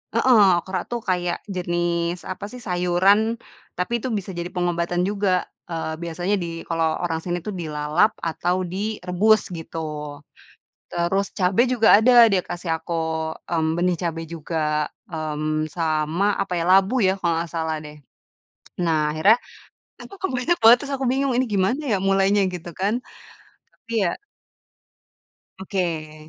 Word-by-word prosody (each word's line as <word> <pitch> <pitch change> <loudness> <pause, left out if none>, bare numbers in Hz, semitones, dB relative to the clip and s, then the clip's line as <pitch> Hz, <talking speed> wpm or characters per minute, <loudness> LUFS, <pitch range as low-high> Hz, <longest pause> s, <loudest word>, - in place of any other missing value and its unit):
heeh, 245 -5 +5 0.2
okra 190 +1 -4
tuh 240 -1 -2
kayak 180 -1 0 0.2
jenis 175 -1 -1
apasih 205 +6 -7
sayuran, 190 +5 +2 0.4
tapi 225 +6 -1
itu 260 - -3
bisa 200 -4 -3
jadi 175 0 -4
pengobatan 175 0 -1
juga, 195 -3 0 0.2
eee, 160 -1 -3
biasanya 175 +4 -1
di 165 -1 -5
kalau 165 -1 0
orang 165 -1 -2
sini 175 0 -2
tuh 210 - -4
dilalap 155 +2 +1 0.2
atau 175 +2 0
direbus 205 +2 +1
gitu. 165 0 -7 1.1
Terus 190 +3 0
cabe 185 +3 +3
juga 230 -3 +2
ada 240 0 +8
dia 185 -2 +2
kasih 175 0 -6
aku, 170 - -5 0.5
mmm, 160 -1 0
benih 180 +1 +2
cabe 165 -2 -3
juga, 165 0 -5 0.5
mmm, 155 -1 -2
sama 160 +2 0 0.2
apa 195 - -3
ya 165 - 0
labu 195 +6 +4
ya 185 - +4
kalau 170 -2 +1
nggak 165 0 -3
salah 160 -1 -1
deh. 150 - -9 0.9
Nah 165 -2 +2
akhirnya, 175 +9 +5 0.6
aku - - -11
kok 380 - -1
banyak 310 +8 +1
banget 230 +2 +9
terus 280 - -5
aku 270 0 -2
bingung, 270 0 +1
"Ini 255 +1 +2
gimana 200 +10 +1
ya 200 - +3
mulainya?" 195 +1 +3
Gitu 175 0 -7
kan. 205 +4 +1 0.8
Tapi 230 - -21 0.2
ya 170 - 0 1.5
oke. 170 -6 -3
180 Hz, 145 wpm, -23 LUFS, 165-205 Hz, 1.5 s, banget